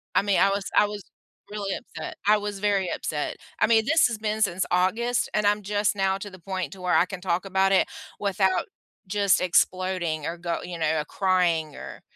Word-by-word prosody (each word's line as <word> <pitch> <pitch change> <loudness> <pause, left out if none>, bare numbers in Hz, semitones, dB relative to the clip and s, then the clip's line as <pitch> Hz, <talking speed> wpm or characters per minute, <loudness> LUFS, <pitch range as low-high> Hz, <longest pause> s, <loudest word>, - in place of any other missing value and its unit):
I - - +5
mean, 200 -1 +1
I 195 - +5
was 195 0 -2
I 210 - +7
was 205 -1 -6 0.5
really 200 -2 -3
upset. 350 +6 -8
I 210 0 +6
was 205 -1 -5
very 200 -3 +1
upset. - - -3 0.2
I - - +4
mean, 225 -1 +4
this 320 0 +4
has 230 -3 -4
been 215 0 -2
since 190 -3 +1
August 220 +7 +1
and 210 -1 +1
I'm 210 +1 +2
just 205 +1 0
now 195 0 +1
to 205 +1 -7
the 185 - -13
point 185 +2 -4
to 190 - -12
where 180 - +1
I 175 - +5
can 185 -1 -8
talk 180 +1 -1
about 190 0 +2
it 190 - +4 0.3
without 190 -2 +1 0.4
just 200 -1 +2
exploding 180 -3 +1
or 170 +2 -3
go 170 -1 -3
you 175 -1 -6
know, 155 -1 0
crying 175 -5 +1
or - - -9
195 Hz, 205 wpm, -25 LUFS, 180-205 Hz, 0.5 s, I